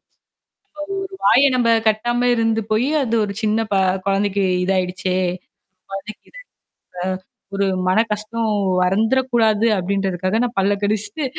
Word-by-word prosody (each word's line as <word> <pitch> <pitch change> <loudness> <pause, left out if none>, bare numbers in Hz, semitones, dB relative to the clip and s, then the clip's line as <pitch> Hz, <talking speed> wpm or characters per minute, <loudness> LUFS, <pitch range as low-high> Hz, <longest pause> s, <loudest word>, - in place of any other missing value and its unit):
அது, - - -58 1.1
ஒரு 385 - -19
வாய 280 +2 +5
நம்ம 240 -2 +2 0.2
கட்டாம 240 +3 +1
இருந்து 225 -1 +1
போய் 225 +5 +2 0.2
அது 230 -2 -1
ஒரு 200 - -5
சின்னப 215 0 0 0.3
குழந்தைக்கு 200 0 +1 0.2
இதாயிடுச்சே! 185 0 -1 0.8
குழந்தைக்கு 195 +2 -7
இதாச்சா - - -12 0.7
இந்த 185 0 -4 0.3
ஒரு 200 0 +1 0.2
மன 185 +4 +3
கஷ்டம் 215 +2 -2 0.3
வந்துறக்கூடாது 225 +2 +2
அப்பிடின்றதுக்காக 190 +1 -1
நான் 240 - -6
பல்ல 200 +1 +2
கடிச்சிட்டு, 210 +6 -1
215 Hz, 120 wpm, -20 LUFS, 195-230 Hz, 1.1 s, வாய